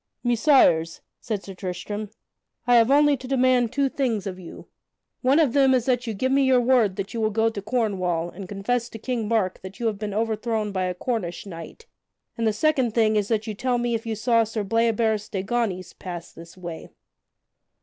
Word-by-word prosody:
"Messires," 235 - +3 0.2
said 210 -4 -4
Sir 195 - -8
Tristram, 190 +3 -5 0.6
"I 245 0 +4
have 230 +1 +4
only 290 +1 +5
to 255 - -9
demand 255 -3 +2
two 280 -1 +1
things 245 -7 -1
of 185 -2 -5
you. 175 - -11 0.6
One 265 +3 +3
of 300 -7 +3
them 270 -2 +5
is 245 -2 0
that 250 -2 0
you 220 - -3
give 260 +6 0
me 275 +1 +4
your 260 -2 +4
word 240 -6 +3
that 195 0 -5
you 230 - -2
will 215 - +2
go 225 +1 +2
to 210 -3 -6
Cornwall 190 -7 -1
and 185 0 -9
confess 235 +5 -1
to 225 - -8
King 230 -1 -3
Mark 210 -5 0
that 190 +1 -10
you 235 - -3
have 215 -3 -1
been 205 -1 -4
overthrown 220 -1 -1
by 185 -1 -1
a 180 0 -2
Cornish 195 -5 -3
knight; 175 - -10 0.5
and 230 -1 0
the - - +3
second 255 -1 +1
thing 220 -2 +3
is 205 -2 +1
that 220 -1 0
you 220 - -4
tell 245 +4 0
me 240 0 -1
if 230 0 -3
you 225 - -1
saw 230 +1 +3
Sir 220 -1 -3
Bleoberis 220 0 +1
de 195 -4 -3
Ganys 195 -5 -2
pass 175 -2 -7
this 165 +2 -13
way?" 170 -3 -8
225 Hz, 210 wpm, -24 LUFS, 195-245 Hz, 0.6 s, only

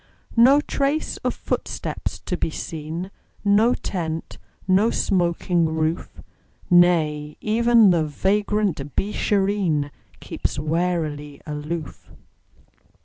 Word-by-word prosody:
No 255 +5 +7
trace 290 +1 -1
of - - -2
footsteps - - -4
to - - -3
be - - -1
seen, 160 +4 -6 0.3
No 210 +4 +4
tent, 165 -4 -4 0.3
no 195 +4 +4
smoking 175 -4 +1
roof; 160 +1 -2 0.5
Nay, 155 -4 +3
even 230 -1 +4
the 170 -2 +2
vagrant 190 -2 -1
Beeshareen 195 -7 0 0.3
Keeps - - -4
warily 155 -2 -2
aloof. 150 +1 -6
175 Hz, 90 wpm, -23 LUFS, 155-205 Hz, 0.5 s, No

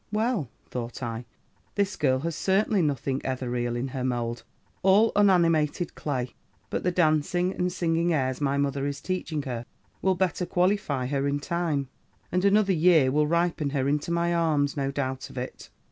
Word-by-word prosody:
'Well,' 215 - 0 0.2
thought 120 +2 -6
I, 115 0 -4 0.5
'this 200 -1 0
girl 130 -4 +2
has 165 +1 -2
certainly 195 +2 +2
nothing 140 -3 -1
ethereal 125 -2 -2
in 125 +3 -2
her 130 0 -4
mould: 120 -2 -2 0.4
all 200 +4 +5
unanimated 170 -5 +3
clay! 130 -4 -3 0.4
But - - -1
the 180 - +2
dancing 175 +2 +2
and 180 0 -1
singing 170 0 +1
airs 130 -3 0
my 140 -1 +1
mother 140 0 0
is 140 0 -4
teaching 175 -5 -3
her, 120 -4 -4 0.4
will 190 -1 +2
better 180 -1 0
qualify 180 -8 +1
her 140 +1 0
in 140 0 0
time, 155 -3 -1 0.4
and 180 +1 +1
another 200 0 +4
year 160 -5 +5
will 150 +2 +2
ripen 170 -2 +1
her 135 -1 0
into 145 +3 0
my 170 0 +1
arms, 155 -4 +1
no 135 -1 -1
doubt 130 -1 -3
of - - -12
it. 125 +1 -6
150 Hz, 170 wpm, -27 LUFS, 135-180 Hz, 0.5 s, all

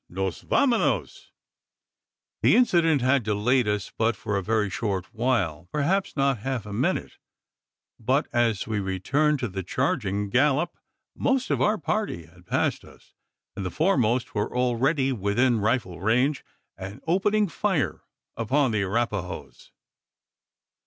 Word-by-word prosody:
nos 95 0 -3
vamonos_!" 250 -5 +1 1.1
The - - +5
incident 170 - +3
had 130 +2 +3
delayed 110 +3 +1
us 105 -2 -2
but 115 +1 +1
for 105 -2 -3
a 100 - 0
very 110 +1 +1
short 95 +1 -3
while 100 -9 -1
perhaps 170 +5 0
not 135 -3 +2
half 130 0 -3
a 105 - -7
minute; - - -1 0.8
but 130 +6 +1
as 115 -4 +1
we 110 -2 -2
returned 130 +11 +1
to 120 - 0
the 95 -2 -5
charging 100 -2 -1
gallop, 145 +6 +2 0.4
most 265 -1 0
of - - +1
our 215 +1 +3
party 205 - -2
had 90 +2 -21
passed - - 0
us; - - -18 0.4
and 100 - -4
the 95 - -2
foremost 125 - +1
were 105 +4 -2
already 130 +3 +1
within 115 +2 +1
rifle 105 -6 -1
range, 125 +8 +1 0.4
and 95 +2 -7
opening 205 +5 +2
fire 190 -4 -1 0.3
upon 130 +3 +1
the 110 -2 0
Arapahoes. 100 -2 -3
120 Hz, 135 wpm, -25 LUFS, 100-140 Hz, 1.1 s, The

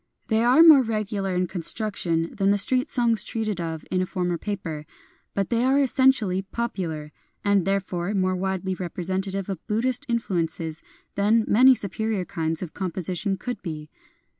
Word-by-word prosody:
They 220 0 +2
are 255 +7 +6
more 310 -5 +9
regular 210 -4 -2
in 180 0 +1
construction 175 -2 -1
than 195 -1 +1
the 205 - +3
street 255 +7 +3
songs 230 -5 +3
treated 215 -5 -3
of 160 -2 -5
in 185 - +1
a 185 - -1
former 180 -3 -2
paper; 165 -8 -5 0.5
but 200 +2 -1
they 235 0 +2
are 265 +2 +3
essentially 260 -8 +2
popular, 185 -8 -4 0.3
and 200 -3 +3
therefore 195 -2 -1
more 185 -1 +1
widely 190 0 -2
representative 190 +2 -3
of 190 -5 -6
Buddhist 245 +5 0
influences 170 -8 -2 0.3
than 215 +3 +2
many 255 +4 +6
superior 210 -1 -2
kinds 160 0 -2
of 170 - -8
composition 185 +1 -2
could 245 -2 -5
be. 155 -4 -7
195 Hz, 155 wpm, -24 LUFS, 180-225 Hz, 0.5 s, more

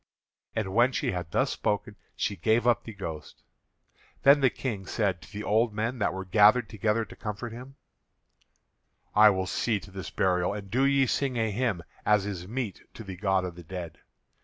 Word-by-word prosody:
And 105 -4 -2
when 120 +4 +4
she 100 - 0
had 90 -3 -4
thus - - +1
spoken 105 0 -2 0.2
she 105 - -1
gave 110 +6 +2
up 120 -2 +3
the 115 - -6
ghost. 80 -6 -7 0.8
Then 140 +1 +7
the 135 - +5
King 105 -9 -5
said 95 -7 0
to - - -14
the 105 0 -6
old 110 +1 +2
men 115 +3 -2
that 100 - +1
were 95 +1 -5
gathered 105 +4 +5
together 110 +1 0
to - - -13
comfort 110 +2 -5
him: 130 +3 -10 1.4
"I 105 0 +8
will 95 -2 0
see 105 +3 0
to 100 +1 -14
this 95 -1 -6
burial. 90 +1 +1
And 100 -2 -8
do 130 +3 +3
ye 140 -1 +4
sing 130 -1 -1
a 110 -1 +1
hymn 105 -6 -1 0.2
as 105 -2 +3
is 95 -3 -5
meet 115 -3 -4
to 110 - -8
the 95 -2 -7
god 95 0 +1
of 90 - -5
the 85 - -11
dead. 85 -1 -7
105 Hz, 195 wpm, -28 LUFS, 95-115 Hz, 1.4 s, I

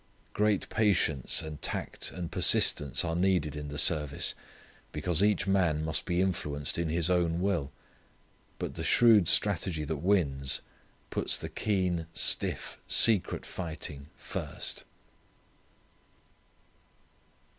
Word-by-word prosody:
Great 105 -2 0
patience 90 - +1
and 75 -2 -8
tact - - -4
and 90 -2 -7
persistence 75 +3 +3
are 80 -1 -2
needed 90 -4 0
in 75 0 -6
the 75 0 -7
service 75 -1 +3 0.6
because 80 +3 +2
each 105 -2 +2
man 90 -6 +1
must 80 - -2
be 90 0 0
influenced 75 -5 -2
in 85 -1 -1
his 85 0 0
own 85 -2 +1
will. 90 -7 -1 0.9
But - - -5
the - - -6
shrewd 110 -7 +5
strategy 90 -5 +1
that 75 +1 -4
wins 70 -6 0 0.5
puts - - 0
the - - -7
keen 90 -5 -1
stiff - - -1
secret 110 -6 +4
fighting 80 -5 -6
first. - - -5
85 Hz, 115 wpm, -29 LUFS, 75-95 Hz, 0.9 s, shrewd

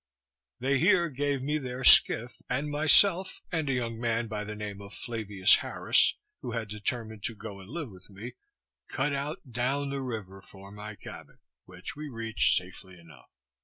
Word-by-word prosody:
They 135 +2 +1
here 175 0 +4
gave 140 -1 -1
me 150 +2 0
their 130 -1 -5
skiff, 120 -1 +5
and 145 +4 -1
myself 170 +5 +4
and 160 -5 -1
a - - +2
young 115 -2 -2
man 115 0 0
by 105 -1 -4
the 105 0 -6
name 105 -1 -6
of 100 +2 -10
Flavius 105 -5 +3
Harris, - - +2 0.3
who 120 - -5
had 115 -3 -3
determined 110 +1 -4
to 115 - -2
go 105 -2 -8
and 95 +1 -13
live 150 -4 -5
with 95 +1 -14
me, 105 +5 -9 0.5
cut 140 +2 -1
out 140 -1 -4
down 135 +4 -1
the 140 -1 -3
river 105 -7 -6
for 100 0 -14
my 105 +1 -8
cabin, - - -11 0.3
which - - -8
we 150 0 -6
reached 115 -2 +1
safely 95 0 -6
enough. 80 -7 -17
115 Hz, 175 wpm, -29 LUFS, 105-140 Hz, 0.5 s, skiff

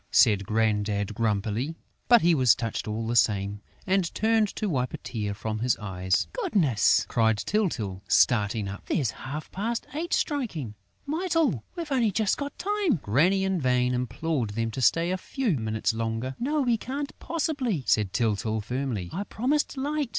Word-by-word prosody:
said 100 -5 +4
Grandad, 105 -2 0
grumpily. 110 +6 -1 0.3
But 240 -4 +6
he 170 0 +5
was 130 -7 +5
touched, 115 -1 -3
all 110 +1 -3
the 115 +1 -1
same, 100 -2 +2 0.2
and 190 -3 +1
turned 220 -1 +3
to 215 - -2
wipe 130 -8 -1
a - - -5
tear 105 -4 -4
from 110 +1 -4
his 120 +1 +1
eyes. 95 -2 0
"Goodness!" 185 - +2
cried 110 -1 +2
Tyltyl, 110 - -1
starting 105 -3 +3
up. 100 +1 -7
"There's 130 -8 0
half 145 +6 -7
past 230 +5 -2
eight 330 +4 -3
striking!... 205 - -1 0.3
Mytyl, 320 - +1
we've 335 -4 -5
only 245 -5 +3
just 205 0 +1
got 285 0 -5
time!..." 410 - +1
Granny 175 - +3
in 190 -3 0
vain 125 -1 +2
implored 125 +1 -1
them 115 0 -1
to 130 - -4
stay 165 +7 +3
a 185 - 0
few 260 0 -1
minutes 110 -1 -1
longer. 115 +3 -3
"No, 295 +5 0
we 240 -3 +2
can't 280 +4 -4
possibly," 280 - -1
said 105 -4 +2
Tyltyl 110 0 0
firmly; 120 -5 -3
"I 195 - -2
promised 280 +7 -1
Light!" 290 0 -1
130 Hz, 165 wpm, -27 LUFS, -, 0.3 s, But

